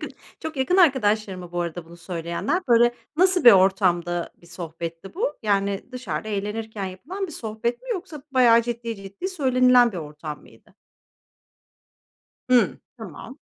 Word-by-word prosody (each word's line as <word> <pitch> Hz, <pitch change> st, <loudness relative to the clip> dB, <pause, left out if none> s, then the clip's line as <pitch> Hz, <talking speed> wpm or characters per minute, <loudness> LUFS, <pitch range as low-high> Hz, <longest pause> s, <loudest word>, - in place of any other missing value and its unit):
Yakın -, -, -6 dB, 0.3 s
çok 320 Hz, -2 st, -6 dB
yakın 265 Hz, +8 st, +1 dB
arkadaşların 215 Hz, -, +3 dB
mı, 175 Hz, -1 st, -11 dB
bu 175 Hz, -, -2 dB
arada 170 Hz, 0 st, -4 dB
bunu 170 Hz, +1 st, -14 dB
söyleyenler? 170 Hz, -, -3 dB
Böyle, 240 Hz, 0 st, +5 dB, 0.2 s
nasıl 365 Hz, -1 st, +3 dB
bir 240 Hz, -, +11 dB
ortamda 180 Hz, -3 st, +2 dB
bir -, -, -17 dB
sohbetti 170 Hz, -, -7 dB
bu? 470 Hz, +7 st, -2 dB
Yani 200 Hz, -1 st, 0 dB
dışarıda 215 Hz, -7 st, -4 dB
eğlenirken 210 Hz, 0 st, -4 dB
yapılan 310 Hz, -, -6 dB
bir 330 Hz, -, -10 dB
sohbet 225 Hz, -, -4 dB
mi? -, -, -13 dB
Yoksa 360 Hz, -, -5 dB
bayağı 235 Hz, -3 st, +5 dB
ciddi, 235 Hz, -1 st, -4 dB
ciddi, 195 Hz, -, -6 dB
söylenilen 255 Hz, -, +4 dB
bir -, -, -6 dB
ortam 150 Hz, -1 st, -7 dB
mıydı? -, -, -21 dB, 1.8 s
Hımm. 250 Hz, -1 st, +4 dB, 0.2 s
Tamam. -, -, -10 dB
215 Hz, 145 wpm, -24 LUFS, 175-255 Hz, 1.8 s, bir